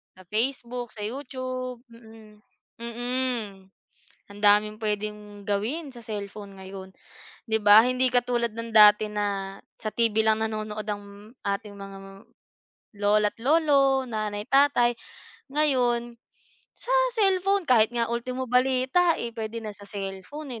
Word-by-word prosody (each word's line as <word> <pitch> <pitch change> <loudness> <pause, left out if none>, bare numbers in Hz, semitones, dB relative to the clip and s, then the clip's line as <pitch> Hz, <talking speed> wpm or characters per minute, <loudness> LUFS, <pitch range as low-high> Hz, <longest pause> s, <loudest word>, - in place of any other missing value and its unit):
Sa 185 -1 -17
Facebook, 245 +2 -2
sa 215 - -12
YouTube. 255 -1 -5
Mm. 220 -2 -17 0.4
Mm. 235 -5 -1 0.6
Ang 205 - -12
daming 210 +1 +4
pwedeng 210 -1 -4
gawin 245 +10 -2
sa 240 - -11
cellphone 205 -2 -7
ngayon. 190 0 -9 0.6
Di 220 - +2
ba? 205 +1 +9
Hindi 255 +1 +2
katulad 240 -2 +1
ng 230 +1 -6
dati 210 0 +7
na 200 -2 -3 0.2
sa 215 - -3
TV 230 0 +1
lang 220 0 +2
nanonood 215 -1 -4
ang 205 +1 -8
ating 200 +1 -3
mga 195 -1 -10 1.0
lola't 205 +1 +2
lolo, 275 -3 +3
nanay, 210 -2 -3
tatay, 270 -3 +4 0.6
ngayon, 245 -5 +1 0.6
sa - - -5 0.2
cellphone, 390 -2 +2
kahit 225 -3 +5
nga 235 -1 0
ultimo 255 +2 -3
balita, 260 +7 +3
eh, 235 - -2
pwede 225 +1 -4
na 215 - -5
sa 205 - -13
cellphone, 210 +7 -7
225 Hz, 125 wpm, -26 LUFS, 210-255 Hz, 1.0 s, ba